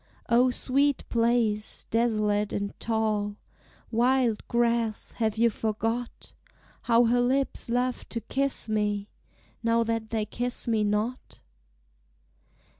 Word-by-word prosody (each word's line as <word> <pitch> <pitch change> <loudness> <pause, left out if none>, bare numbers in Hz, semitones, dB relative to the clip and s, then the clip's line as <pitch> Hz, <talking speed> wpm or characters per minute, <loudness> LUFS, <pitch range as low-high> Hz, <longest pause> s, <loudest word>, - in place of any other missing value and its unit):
O 245 +2 +5
sweet 275 +3 +1
place, 230 -2 0
desolate 215 -3 +1
in 200 0 -3
tall 215 -2 -1 0.6
Wild 240 -1 +2
grass, 235 -2 0
have 220 -2 0
you 235 +1 +4
forgot 225 +3 -3 0.5
How 235 0 +4
her 245 +1 +3
lips 265 0 0
loved 250 +1 -1
to 230 - -4
kiss 270 +3 -1
me, 210 -1 -1 0.5
Now 230 0 +2
that 225 -1 -2
they 220 -2 -1
kiss 245 +4 -1
me 220 -2 +2
not? 210 +4 -2
230 Hz, 115 wpm, -27 LUFS, 215-245 Hz, 0.6 s, O